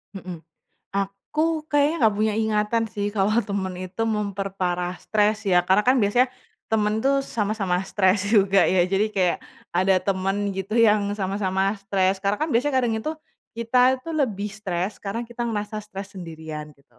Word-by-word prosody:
Mhm. 180 -3 -7 0.5
Aku 300 +12 -1
kayaknya 290 +2 +3
nggak 215 -2 +4
punya 215 0 +1
ingatan 220 +1 +1
sih, 205 0 -3
kalau 195 0 +2 0.2
teman 195 -2 -2
itu 185 +4 -4
memperparah 195 -4 -2
stres, 215 0 0
ya. 180 -2 +4
Karena 190 +3 +3
kan 255 +1 +5
biasanya, 240 +5 +4 0.4
teman 215 -1 +1
tuh 275 +1 +3
sama-sama 205 -7 -1
stres 190 0 +2
juga, 195 -3 +5
ya? 180 -1 +3
Jadi 195 +3 +1
kayak, 180 -3 +2 0.4
ada 185 +2 +3
teman, 195 +1 0
gitu, 195 +2 -4
yang 215 -3 +5 0.2
sama-sama 190 0 0
stres. 195 -1 +1
Karena 200 +1 +1
kan 310 - 0
biasanya 270 +3 +1
kadang 240 -3 +1
itu, 305 +8 -3 0.4
kita 230 +2 0 0.2
itu 255 - -12
lebih 215 -9 -1
stres, 195 -2 -3
karena 205 +4 -3
kita 235 +1 -6
ngerasa 210 -2 -3
stres 200 0 -9
sendirian, 160 -4 -7
gitu. 140 -4 -30
200 Hz, 160 wpm, -24 LUFS, 190-220 Hz, 0.5 s, kan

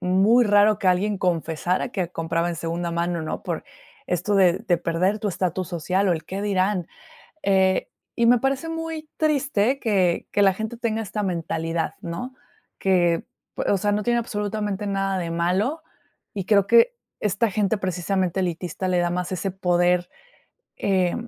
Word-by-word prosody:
muy 190 +7 +4
raro 205 0 +4
que 190 - +2
alguien 200 +3 +2
confesara 175 +3 -1
que 180 -6 -2
compraba 165 0 -1
en 170 - -3
segunda 170 +2 -3
mano, 170 0 -1
¿no? 155 - -4
Por - - -3 0.5
esto 180 +3 0
de 185 -3 +5
de 190 -6 0
perder 180 +5 0
tu 210 - -1
estatus 185 -1 -2
social 185 +3 0
o - - +4
el 160 -1 -3
qué 195 +3 -5
dirán. 190 -3 0 0.6
Eh, 190 -1 +2 0.3
y 235 - +3
me 245 +1 +6
parece 270 +5 -1
muy 325 -1 -5
triste 275 -5 +1
que 190 -8 +1
que 205 - +2
la 195 -1 +5
gente 220 +4 -5
tenga 225 -2 -1
esta 210 0 -4
mentalidad, 165 -2 -2
¿no? 180 +10 -5 0.5
Que, 175 -3 +2 0.3
o - - +1
sea, 205 +2 0
pue 205 - +2
no 210 - -2
tiene 240 +1 +2
absolutamente 210 -2 -3
nada 195 -1 0
de 170 -2 -3
malo, 190 - 0 0.5
y 195 -3 -4
creo 200 -3 +4
que 475 +1 +5 0.2
esta 210 +2 +1
gente, 205 +1 +1
precisamente, 185 0 -1
elitista, 180 +1 -3
le 180 -1 +2
da 175 0 +1
más 180 +1 -2
ese 185 +2 -2
poder, 180 -1 +1 0.7
eh, 185 -3 +1
190 Hz, 170 wpm, -24 LUFS, 175-210 Hz, 0.7 s, me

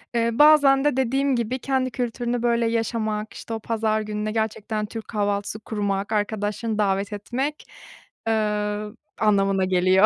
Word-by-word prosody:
Eee, 230 0 +2
bazen 285 -1 +6
de 295 -3 +2
dediğim 265 +1 +1
gibi 240 +2 -1
kendi 260 -1 0
kültürünü, 240 0 -2
böyle, 235 -1 +2
yaşamak, 220 -2 -1
işte, 225 - -7
o 225 - -2
pazar 220 -1 0
gününe 210 0 -3
gerçekten 220 -1 -2
Türk 225 +1 -7
kahvaltısı 205 0 -1
kurmak, 205 -2 -2
arkadaşlarını 210 +1 -1
davet 200 0 0
etmek, 265 +8 -3 0.6
eee, 210 -1 0 0.4
anlamına 195 -3 +3
geliyor. 185 +2 +4
220 Hz, 135 wpm, -24 LUFS, 210-240 Hz, 0.6 s, bazen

